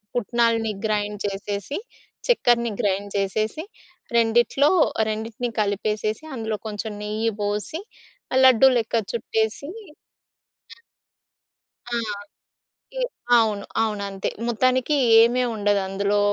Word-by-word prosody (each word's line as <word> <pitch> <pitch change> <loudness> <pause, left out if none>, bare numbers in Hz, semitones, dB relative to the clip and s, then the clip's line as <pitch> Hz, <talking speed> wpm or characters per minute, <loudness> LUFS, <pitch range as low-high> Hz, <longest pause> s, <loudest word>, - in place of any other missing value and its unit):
పుట్నాలని 230 -1 +1 0.2
grind 210 -1 -1
చేసేసి, 200 +5 -4 0.5
చెక్కెరని 235 - +3
grind 200 0 -1
చేసేసి, 215 - -1 0.5
రెండిట్లో 240 +6 +3 0.4
రెండిటిని 225 +2 -3
కలిపేసేసి, 210 +4 -1
అందులో 220 -2 -3
కొంచం 210 +1 -5
నెయ్యి 215 +2 -1
బోసి, 210 - -2 0.5
ఆహ్, 260 - +4
లడ్డూలెక్క 250 -2 +5 0.2
చుట్టసీ 225 +4 -1 1.1
ఆ! - - -25 1.1
ఆ! - - -2 1.1
ఎ - - +1 0.3
అవును. 215 -3 +2 0.2
అవునంతే. 200 -3 -2 0.2
మొత్తానికీ 255 +4 +2 0.2
ఏమీ 240 +2 +4
ఉండదు. 205 -1 +1
అందులో 200 +1 0
220 Hz, 90 wpm, -23 LUFS, 205-240 Hz, 1.1 s, లడ్డూలెక్క